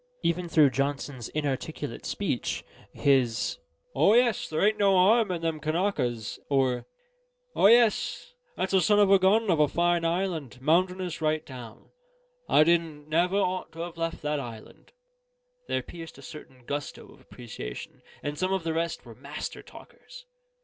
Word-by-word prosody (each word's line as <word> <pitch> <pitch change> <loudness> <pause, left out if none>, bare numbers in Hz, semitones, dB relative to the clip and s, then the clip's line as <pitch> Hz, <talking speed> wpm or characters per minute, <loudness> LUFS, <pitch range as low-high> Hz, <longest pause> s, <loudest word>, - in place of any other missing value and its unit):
Even 175 +1 0
through 150 -4 +5
Johnson's 140 -2 -3
inarticulate 145 -4 -4
speech, - - -2 0.3
his 130 - +1 0.3
"O 210 - +4
yes, 240 -4 +2
there 160 +5 +1
ain't 215 0 0
no 200 -1 +4
harm 215 +4 +4
in 170 -2 -3
them 165 -2 -1
Kanakas," 155 - -1
or 130 -3 +1 0.7
"O - - +5
yes, 235 - +3 0.2
that's 190 - -2
a 190 - +5
son 210 +3 +3
of 205 -1 +5
a 195 - +7
gun 200 +2 +3
of 165 - +2
a 150 - +5
fine 175 +2 +1
island, 165 -7 -2
mountainious 180 +4 0
right 155 0 0
down; 120 -4 -11 0.6
I 150 - +6
didn't 160 -3 0
never 175 +5 +2
ought 185 -2 -1
to 165 - -7
have 170 0 -6
left 165 -1 -4
that 150 0 -1
island," 115 -5 -10 0.8
there - - -1
pierced 165 -1 -10
a - - -13
certain 130 -5 -12
gusto 145 +2 -5
of - - -20
appreciation: 85 - -9 0.2
and 145 0 -4
some 185 +1 0
of 190 -2 0
the 165 -1 -1
rest 170 +1 -2
were - - -11
master - - -7
talkers. - - -14
165 Hz, 160 wpm, -27 LUFS, 140-185 Hz, 0.8 s, a